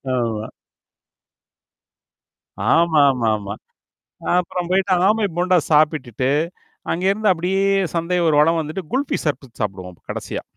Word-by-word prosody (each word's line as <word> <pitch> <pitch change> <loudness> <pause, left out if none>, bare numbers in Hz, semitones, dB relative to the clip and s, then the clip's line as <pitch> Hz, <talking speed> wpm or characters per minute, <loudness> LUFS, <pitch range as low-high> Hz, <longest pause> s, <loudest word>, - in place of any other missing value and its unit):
ஆமா. 115 -3 -2 2.3
ஆமாமாமா. 130 -11 +2 0.9
அப்புறம் 175 0 -4
போயிட்டு 190 +1 +2 0.2
ஆமை 215 0 +2
போண்டா 180 +1 +3
சாப்பிட்டுட்டு, 140 -5 +2 0.6
அங்கேருந்து 195 +4 +1
அப்படியே 185 +3 -1 0.3
சந்தை 170 +2 0
ஒரு 155 - +2
வளம் 165 +2 +3
வந்துட்டு 160 +4 -5
குல்ஃபி 270 +3 0
சர்பத் 135 -5 -4
சாப்பிடுவோம் 95 -3 -4
அப்ப - - -29
கடைசியா. - - -5
160 Hz, 100 wpm, -20 LUFS, 125-180 Hz, 2.3 s, போண்டா